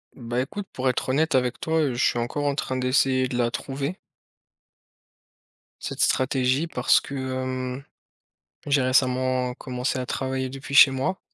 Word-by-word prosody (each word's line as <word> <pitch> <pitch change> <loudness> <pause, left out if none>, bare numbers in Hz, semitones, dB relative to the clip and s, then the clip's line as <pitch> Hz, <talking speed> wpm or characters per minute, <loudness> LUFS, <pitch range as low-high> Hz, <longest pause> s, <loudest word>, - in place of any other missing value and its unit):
Bah, 120 0 -2
écoute 195 +9 -5
pour 130 0 0
être 125 - -2
honnête 155 +5 +1
avec 125 -1 +1
toi, 160 0 -1
heu, 140 -4 0
je - - 0
suis - - +1
encore 145 +5 -2
en 140 - +1
train 130 - -2
d'essayer 130 0 +2
de 125 -1 -4
la 120 -1 +2
trouver 140 +7 -4 1.8
cette - - -4
stratégie 130 +3 +2
parce 125 -5 +3
que, 140 - -8
hem, 130 0 -3 0.8
j'ai 140 -1 +3
récemment 130 -1 +1
commencé 125 +1 -3
à 125 - -3
travailler 130 0 -2
depuis 135 +1 -7
chez 140 -1 +9
moi 135 +9 -2
130 Hz, 160 wpm, -24 LUFS, 125-140 Hz, 1.8 s, chez